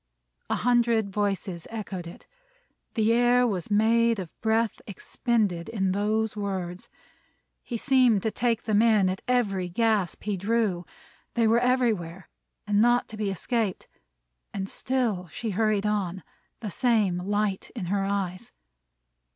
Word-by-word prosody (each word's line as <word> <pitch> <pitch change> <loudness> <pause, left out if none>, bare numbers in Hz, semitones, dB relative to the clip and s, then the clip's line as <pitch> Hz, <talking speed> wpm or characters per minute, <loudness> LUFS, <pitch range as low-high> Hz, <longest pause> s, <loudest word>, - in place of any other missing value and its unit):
A - - +1
hundred 235 -4 +2
voices 195 -4 -2
echoed 195 -6 -6
it. 170 - -12 0.7
The 225 0 +3
air 245 +1 +4
was 195 -7 -2
made 230 +2 +3
of 180 -4 -6
breath 225 0 +1
expended 205 -3 -1
in 195 -4 0
those 215 +2 0
words. 190 -3 -4 0.7
He 240 - -5
seemed 250 -5 +3
to 220 - 0
take 235 -1 0
them 215 -1 +2
in, 215 -5 +4
at 185 - -5
every 200 -8 +1
gasp 215 -1 0
he 205 -1 -2
drew. 200 -3 0 0.5
They 235 -1 +3
were 225 +2 +4
everywhere, 220 -9 0 0.4
and 205 0 +2
not 240 +1 +3
to 220 - -8
be 210 -2 -1
escaped. 205 +2 -2 0.7
And 195 -1 -3
still 225 -7 -1
she 220 +7 -4
hurried 215 0 +1
on; 190 -4 -1 0.4
the 210 -4 -4
same 210 -6 +2
light 205 +1 -1
in 215 -7 -4
her 195 +2 0
eyes. 195 -2 -3
210 Hz, 140 wpm, -26 LUFS, 190-230 Hz, 0.7 s, air